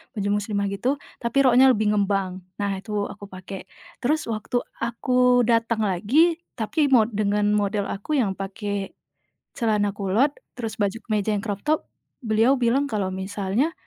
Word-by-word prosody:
baju 200 -1 -1
muslimah 200 -1 -2
gitu, 245 +8 0 0.3
tapi 235 +3 -1
roknya 255 +1 +6
lebih 215 -2 +1
ngembang. 195 -2 0 0.2
Nah, 200 - 0
itu 215 +3 -10 0.2
aku 205 0 -10
pakai, 185 0 -9 0.4
terus 305 +5 +1
waktu 225 +2 -2 0.2
aku 250 +1 +3
datang 230 -1 +2
lagi 275 - +3 0.2
tapi 285 +7 +1
mo 240 -4 +7
dengan 210 -2 0
model 205 0 0
aku 255 +10 -3
yang 210 -6 +1
pakai 200 0 -4 0.6
celana 210 -3 +1
kulot, 205 +8 +2 0.3
terus 225 -3 -4
baju 200 +2 0
kemeja 215 0 +1
yang 200 - -2
crop 205 -2 -3
top 310 +1 +3 0.4
beliau 225 +4 +3
bilang 250 +3 +2
kalau 200 -3 -1
misalnya 200 - -1
215 Hz, 150 wpm, -24 LUFS, 200-245 Hz, 0.6 s, mo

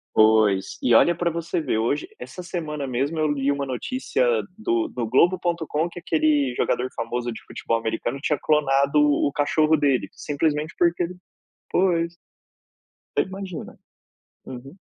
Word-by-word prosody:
Pois, 110 -3 +4
e 120 - +3
olha 170 +9 +6
pra 170 0 0
você 170 +1 -2
ver, 135 -7 -1
hoje 115 +6 0
essa 180 - -8
semana 155 -5 -4
mesmo 135 +5 -2
eu 155 -1 +2
li 140 -1 0
uma 140 0 0
notícia 255 - -1 0.3
do 115 - 0
do 120 -2 -3
Globo.com 170 +3 +1
que 175 - -9
aquele 150 -5 +1
jogador 125 +1 0
famoso 120 +1 -3
de 110 - -7 0.3
americano, 115 +4 -1
tinha 150 +1 +1
clonado 140 -1 +2
o 145 -1 +3
o - - -2
cachorro 155 +2 +2
dele, 140 -4 +1
simplesmente 150 +1 -1
porque 175 0 +2
ele 175 +1 -5 0.6
pois. 170 -2 +1 1.0
Te - - +4
imagina. 190 -3 -8 0.7
Aham. 135 +7 -9
150 Hz, 145 wpm, -24 LUFS, 130-170 Hz, 1.0 s, olha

